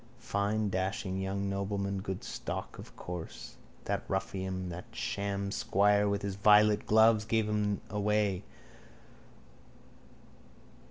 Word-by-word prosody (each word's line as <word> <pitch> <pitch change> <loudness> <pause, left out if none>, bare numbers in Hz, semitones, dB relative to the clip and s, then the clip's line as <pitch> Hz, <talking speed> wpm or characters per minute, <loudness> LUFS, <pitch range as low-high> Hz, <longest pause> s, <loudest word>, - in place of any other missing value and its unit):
Fine 105 +1 0
dashing 95 0 -2
young 100 +1 -2
nobleman. 100 0 -2
Good 95 -1 -4
stock, - - -5
of - - -11
course. 90 -2 -7 0.3
That - - -1
ruffian, 95 -1 -2
that 90 +1 -6
sham 100 0 -2
squire, 105 +1 +3
with 100 0 -1
his 100 -1 -2
violet 105 +1 +5
gloves 110 0 +5
gave 110 0 +1
him 105 -1 0
away. 105 -2 +1
100 Hz, 110 wpm, -31 LUFS, 95-105 Hz, 0.3 s, violet